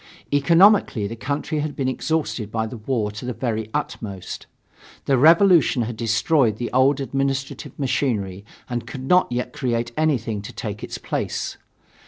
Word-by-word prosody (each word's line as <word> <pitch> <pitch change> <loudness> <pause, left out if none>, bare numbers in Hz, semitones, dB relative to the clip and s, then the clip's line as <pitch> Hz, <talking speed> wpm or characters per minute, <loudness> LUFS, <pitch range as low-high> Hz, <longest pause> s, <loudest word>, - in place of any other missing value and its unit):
Economically 165 - +5
the 110 +3 -4
country 145 +5 -2
had 150 0 -3
been 135 - -1
exhausted 130 -6 -2
by 110 0 -1
the 115 +2 -7
war 110 -2 -1
to 105 +3 -8
the 125 0 -3
very 110 -3 -3
utmost. 100 -5 -5 0.6
The 135 - +3
revolution 165 -2 +5
had 115 +1 -4
destroyed 115 +2 +2
the 120 - -4
old 135 +2 +3
administrative 135 0 -3
machinery 105 -9 -1 0.2
and 120 -1 -4
could 130 -2 -7
not 180 -4 +4
yet 125 +1 -2
create 120 -5 -1
anything 125 -9 0
to 105 - -8
take 105 -2 -6
its - - -5
place. - - -3
125 Hz, 155 wpm, -22 LUFS, 110-145 Hz, 0.6 s, Economically